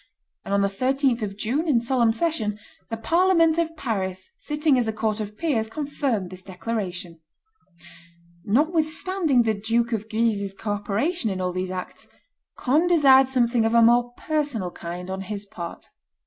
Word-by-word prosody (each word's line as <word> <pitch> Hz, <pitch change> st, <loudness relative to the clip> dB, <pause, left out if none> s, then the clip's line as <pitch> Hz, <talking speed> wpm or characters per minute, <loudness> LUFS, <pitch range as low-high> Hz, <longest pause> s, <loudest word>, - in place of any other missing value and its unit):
On 200 Hz, 0 st, +1 dB
the -, -, +3 dB
13th 255 Hz, +4 st, +1 dB
of 200 Hz, -2 st, -4 dB
June, 270 Hz, +11 st, -1 dB
in 270 Hz, -6 st, +4 dB
solemn 235 Hz, -1 st, +2 dB
session, 225 Hz, -6 st, -1 dB, 0.3 s
the 225 Hz, -, -3 dB
Parliament 335 Hz, +4 st, +3 dB
of 330 Hz, -1 st, -2 dB
Paris, 190 Hz, -7 st, -3 dB
sitting 300 Hz, -1 st, +1 dB
as 235 Hz, -, 0 dB
a 220 Hz, -, -1 dB
court 215 Hz, 0 st, -1 dB
of 210 Hz, 0 st, -6 dB
peers, 230 Hz, -10 st, 0 dB
confirmed 270 Hz, -, -2 dB
this 185 Hz, 0 st, -8 dB
declaration. 180 Hz, -3 st, -5 dB, 1.2 s
Notwithstanding 315 Hz, -, +1 dB
the 220 Hz, -1 st, +1 dB
Duke 230 Hz, +3 st, 0 dB
of 220 Hz, -1 st, -3 dB
Guise's 215 Hz, -3 st, 0 dB
co 210 Hz, +1 st, -4 dB
operation 215 Hz, -, -1 dB
in 190 Hz, -2 st, -3 dB
all 180 Hz, -1 st, -1 dB
these 185 Hz, 0 st, -3 dB
acts, 185 Hz, 0 st, -6 dB, 0.5 s
Conde 305 Hz, +7 st, +2 dB
desired 270 Hz, -6 st, +6 dB
something 240 Hz, -3 st, +2 dB
of 225 Hz, +1 st, +1 dB
a 235 Hz, -, +7 dB
more 240 Hz, +1 st, +4 dB
personal 290 Hz, -, -2 dB
kind 175 Hz, +2 st, -7 dB
on 190 Hz, 0 st, -4 dB
his 200 Hz, +1 st, -5 dB
part. 180 Hz, -5 st, -7 dB
230 Hz, 160 wpm, -24 LUFS, 200-280 Hz, 1.2 s, a